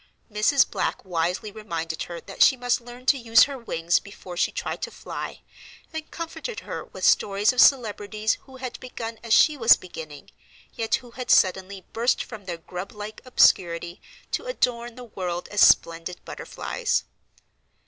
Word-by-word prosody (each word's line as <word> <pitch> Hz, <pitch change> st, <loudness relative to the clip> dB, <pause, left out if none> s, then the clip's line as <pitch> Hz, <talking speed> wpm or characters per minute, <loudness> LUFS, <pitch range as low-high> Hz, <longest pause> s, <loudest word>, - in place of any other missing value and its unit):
Mrs. 215 Hz, +7 st, +4 dB
Black -, -, -2 dB
wisely 180 Hz, +4 st, -1 dB
reminded 165 Hz, -7 st, -5 dB
her 170 Hz, -1 st, -6 dB
that -, -, -9 dB
she 265 Hz, -, +7 dB
must 245 Hz, 0 st, 0 dB
learn 245 Hz, +1 st, -12 dB
to 275 Hz, +1 st, +4 dB
use 230 Hz, -1 st, +6 dB
her 280 Hz, -, -2 dB
wings 170 Hz, -7 st, +1 dB
before 190 Hz, -3 st, -10 dB
she -, -, +1 dB
tried -, -, -4 dB
to -, -, -3 dB
fly, -, -, -7 dB, 0.5 s
and 315 Hz, -1 st, -6 dB
comforted 335 Hz, +7 st, -6 dB
her -, -, -6 dB
with -, -, -5 dB
stories 205 Hz, +3 st, +3 dB
of 250 Hz, -, +4 dB
celebrities 215 Hz, -4 st, +3 dB
who 265 Hz, -, -13 dB
had 255 Hz, -1 st, -6 dB
begun 230 Hz, -3 st, -7 dB
as 230 Hz, -, -8 dB
she 305 Hz, +7 st, +6 dB
was 230 Hz, -2 st, +7 dB
beginning, 155 Hz, -5 st, -10 dB, 0.4 s
yet 225 Hz, -1 st, 0 dB
who 250 Hz, -2 st, -9 dB
had 250 Hz, +1 st, -7 dB
suddenly 190 Hz, 0 st, +2 dB
burst 235 Hz, +2 st, +1 dB
from 215 Hz, -4 st, -10 dB
their 175 Hz, -2 st, -4 dB
grub 180 Hz, +3 st, -7 dB
like 210 Hz, 0 st, -8 dB
obscurity 175 Hz, -7 st, +3 dB, 0.3 s
to -, -, -2 dB
adorn 240 Hz, -, -1 dB
the 250 Hz, -, -9 dB
world 180 Hz, -6 st, -4 dB
as 205 Hz, -, 0 dB
splendid 170 Hz, +2 st, +4 dB
butterflies. -, -, -2 dB
215 Hz, 165 wpm, -25 LUFS, 180-245 Hz, 0.5 s, she